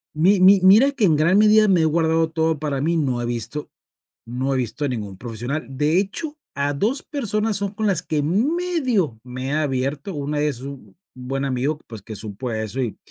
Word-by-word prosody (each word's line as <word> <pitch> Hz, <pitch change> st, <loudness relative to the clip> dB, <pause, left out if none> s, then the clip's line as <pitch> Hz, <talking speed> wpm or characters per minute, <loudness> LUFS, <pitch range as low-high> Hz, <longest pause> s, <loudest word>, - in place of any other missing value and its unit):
Mi 185 Hz, +5 st, +3 dB
mi 195 Hz, +1 st, +7 dB
mira 215 Hz, +9 st, +6 dB
que 260 Hz, -7 st, +1 dB
en 160 Hz, -, +4 dB
gran 165 Hz, +6 st, +3 dB
medida 215 Hz, 0 st, +5 dB
me 180 Hz, -4 st, +4 dB
he -, -, +3 dB
guardado 160 Hz, 0 st, +2 dB
todo 160 Hz, -1 st, 0 dB
para 145 Hz, -3 st, -2 dB
mí, 165 Hz, +3 st, +1 dB
no 130 Hz, -6 st, 0 dB
he -, -, -2 dB
visto 120 Hz, +5 st, -4 dB, 0.6 s
no 130 Hz, +3 st, -2 dB
he -, -, +1 dB
visto 130 Hz, +4 st, -2 dB
a -, -, -1 dB
ningún 105 Hz, -7 st, -5 dB
profesional. 120 Hz, +6 st, -4 dB
De 150 Hz, +5 st, +1 dB
hecho, 295 Hz, -, -3 dB, 0.2 s
a 140 Hz, +1 st, 0 dB
2 220 Hz, -, -1 dB
personas 220 Hz, -7 st, -1 dB
son 200 Hz, -1 st, -3 dB
con 215 Hz, +1 st, -1 dB
las 185 Hz, -4 st, +1 dB
que 155 Hz, -4 st, -1 dB
medio 245 Hz, -, 0 dB
me 130 Hz, +1 st, -6 dB
he 140 Hz, -, -2 dB
abierto, 145 Hz, +3 st, -1 dB
una 145 Hz, +1 st, -2 dB
es 145 Hz, -5 st, -1 dB
un 140 Hz, +2 st, -10 dB, 0.2 s
buen 135 Hz, +2 st, -4 dB
amigo, 140 Hz, +3 st, -1 dB
pues 110 Hz, -2 st, -9 dB
que 110 Hz, 0 st, -8 dB
supo 110 Hz, +4 st, -6 dB
eso 110 Hz, +3 st, -3 dB
y 120 Hz, -5 st, -2 dB
150 Hz, 205 wpm, -22 LUFS, 130-195 Hz, 0.6 s, mi